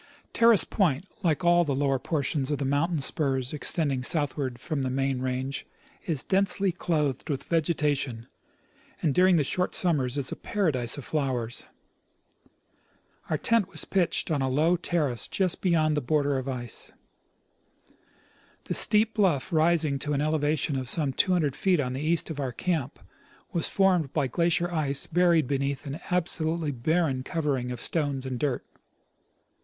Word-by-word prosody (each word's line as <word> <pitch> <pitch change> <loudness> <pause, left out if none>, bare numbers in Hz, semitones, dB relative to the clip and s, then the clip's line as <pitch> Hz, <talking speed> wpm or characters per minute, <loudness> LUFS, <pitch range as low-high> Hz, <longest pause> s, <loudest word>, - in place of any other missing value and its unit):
Terrace 230 -3 +6
point, 175 -5 0 0.2
like 170 +1 0
all 175 0 +5
the 145 -4 -1
lower 135 -1 +1
portions 140 0 -1
of 145 - 0
the 140 - -3
mountain 145 +4 0
spurs 135 -2 +1
extending 145 -3 +1
southward 135 -3 0
from 155 +1 -3
the 130 - -1
main 135 0 -1
range, 130 +1 -3 0.4
is 155 -6 -1
densely 195 0 +1
clothed 155 -6 -2
with 140 -3 -2
vegetation, 150 -7 -1 0.8
and 150 - +2
during 185 +2 +5
the 155 - +3
short 180 +6 -1
summers 145 -7 +1
is 135 -2 0
a - - -3
paradise 150 - -1
of 145 - -7
flowers. 130 -6 -2 1.6
Our 155 - +1
tent 230 +3 +2
was - - -5
pitched 180 -3 +1
on 145 -3 0
a 135 - 0
low 155 +7 +2
terrace 155 -8 -1
just 185 -3 -1
beyond 160 -4 +2
the 150 - 0
border 145 +1 +1
of 130 - -6
the 135 - -2
ice. 120 -2 -6 1.7
The - - -4
steep 215 +1 +3
bluff 190 - +1
rising 155 -3 +2
to 150 +2 -3
an 140 - 0
elevation 150 -1 0
of 130 -2 -4
some 145 -3 +1
200 165 -4 +1
feet 185 -5 +2
on 125 -3 -1
the 130 - -4
east 165 +1 0
of 150 - -6
our 135 -3 -2
camp 150 +1 -2 0.6
was 170 -3 +2
formed 180 -7 +2
by - - +1
glacial 170 +5 +1
ice 145 -4 +1
buried 170 -2 +3
beneath 140 +2 -2
an 140 +3 -5
absolutely 165 -3 -1
barren 140 +1 0
covering 140 -5 -2
of 125 -2 -5
stones 140 -2 -1
and 130 -2 -4
dirt. 140 -3 -1
150 Hz, 160 wpm, -27 LUFS, 135-170 Hz, 1.7 s, Terrace